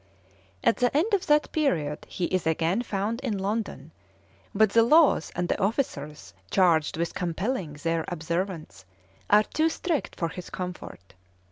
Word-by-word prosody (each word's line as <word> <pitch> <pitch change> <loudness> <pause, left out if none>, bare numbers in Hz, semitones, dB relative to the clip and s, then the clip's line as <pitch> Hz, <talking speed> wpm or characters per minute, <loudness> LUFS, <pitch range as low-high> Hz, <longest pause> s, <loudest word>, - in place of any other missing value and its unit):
At - - +3
the 250 +2 +2
end 400 +8 +1
of 395 - +1
that 300 0 +3
period 160 - -1
he 180 - -2
is 185 -2 -1
again 165 +6 +1
found 215 0 -2
in 230 -7 -2
London, 205 +3 -3 0.6
but 215 0 +3
the 230 - +5
laws 295 - +4
and 175 0 -1
the - - -1
officers 150 - -2 0.2
charged 165 -5 +3
with 170 0 -2
compelling 180 - -2
their 165 +2 -1
observance 170 - -4 0.5
are 210 +1 +6
too 315 +8 0
strict 325 -1 -2
for 170 - -2
his 180 +1 -8
comfort. 180 - -7
190 Hz, 150 wpm, -26 LUFS, 165-235 Hz, 0.6 s, are